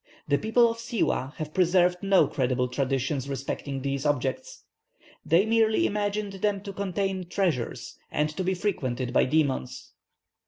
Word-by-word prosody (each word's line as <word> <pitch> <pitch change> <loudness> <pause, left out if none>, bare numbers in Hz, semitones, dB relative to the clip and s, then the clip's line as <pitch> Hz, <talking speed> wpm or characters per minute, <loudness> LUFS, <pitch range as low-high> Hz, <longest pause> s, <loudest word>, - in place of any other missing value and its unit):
The 140 -1 +2
people 235 +2 +4
of 230 0 -2
Siwâh 195 - -1
have 155 -1 -6
preserved 180 0 +3
no 195 -1 +4
credible 125 -2 0
traditions 135 +1 -1
respecting 135 0 -4
these 140 0 -2
objects. 140 -3 -2 0.6
They 170 +5 +3
merely 220 -1 +3
imagined 205 0 -1
them 205 -2 +1
to 200 -1 -7
contain 195 -2 -2
treasures, 175 - -2
and 150 - 0
to 185 - -2
be 190 +1 0
frequented 130 - -2
by - - +4
demons." 135 -3 -1
170 Hz, 145 wpm, -27 LUFS, 135-200 Hz, 0.6 s, people